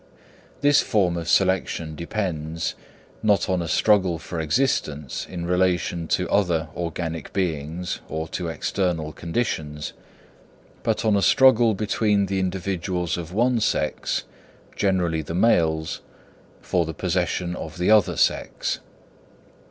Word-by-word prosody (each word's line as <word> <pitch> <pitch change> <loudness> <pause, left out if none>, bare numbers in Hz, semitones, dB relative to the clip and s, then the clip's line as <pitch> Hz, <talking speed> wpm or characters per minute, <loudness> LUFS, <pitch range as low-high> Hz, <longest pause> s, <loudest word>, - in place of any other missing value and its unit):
This 145 0 +5
form 95 -5 +1
of 85 -1 -4
selection 95 -4 +1
depends, 85 -2 -3 0.5
not 100 -4 +3
on 95 -2 +1
a 85 - -3
struggle 95 -1 +3
for 80 +1 -6
existence 75 - -1
in 85 -2 -5
relation 90 -2 +1
to 90 +2 +1
other 85 -6 +1
organic 85 -1 -4
beings 85 -1 -2
or 80 +1 -3
to 90 - -3
external 80 -2 -1
conditions, 80 -5 -3 0.9
but - - -1
on 110 -2 +4
a 100 - +2
struggle 120 -2 +5
between 105 0 +1
the 95 0 -1
individuals 90 -1 -2
of 85 -1 -6
one 120 +4 +2
sex, 75 -7 0 0.5
generally 90 -5 +1
the 80 +2 -5
males, 80 -6 +2 0.6
for 90 - +1
the 80 -1 -5
possession 90 0 -1
of 80 -2 -7
the 90 +4 +2
other 105 -5 +4
sex. - - 0
90 Hz, 125 wpm, -24 LUFS, 80-100 Hz, 0.9 s, This